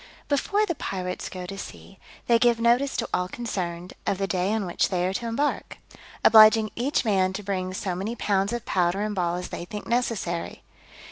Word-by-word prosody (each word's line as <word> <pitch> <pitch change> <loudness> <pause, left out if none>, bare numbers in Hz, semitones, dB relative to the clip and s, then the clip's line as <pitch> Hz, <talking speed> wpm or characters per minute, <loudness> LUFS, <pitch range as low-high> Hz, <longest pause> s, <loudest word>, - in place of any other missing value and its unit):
_ - - -34
BEFORE 400 +9 +1
the 340 - -1
pirates 185 - -4
go 180 -1 -7
to 195 +2 -7
sea, 195 -1 -10 0.3
they 235 -1 +4
give 240 -1 +3
notice 240 +4 +2
to 230 - -1
all 180 0 +1
concerned, 180 -5 -4
of 195 - +1
the 195 - -1
day 185 0 0
on 220 -2 0
which 175 - 0
they 180 -2 0
are 185 - -1
to 235 +4 -3
embark; 280 +6 -2 0.5
obliging 220 0 +7
each 255 +2 0
man 190 -3 +2
to 205 +2 -5
bring 185 -2 -2
so 185 0 -3
many 195 +6 -3
pounds 200 -2 0
of 240 -1 -4
powder 180 +2 +1
and 210 0 -1
ball 175 -3 0
as 180 0 -5
they - - -5
think 210 +4 -7
necessary. 230 -8 -2
200 Hz, 205 wpm, -25 LUFS, 185-230 Hz, 0.5 s, obliging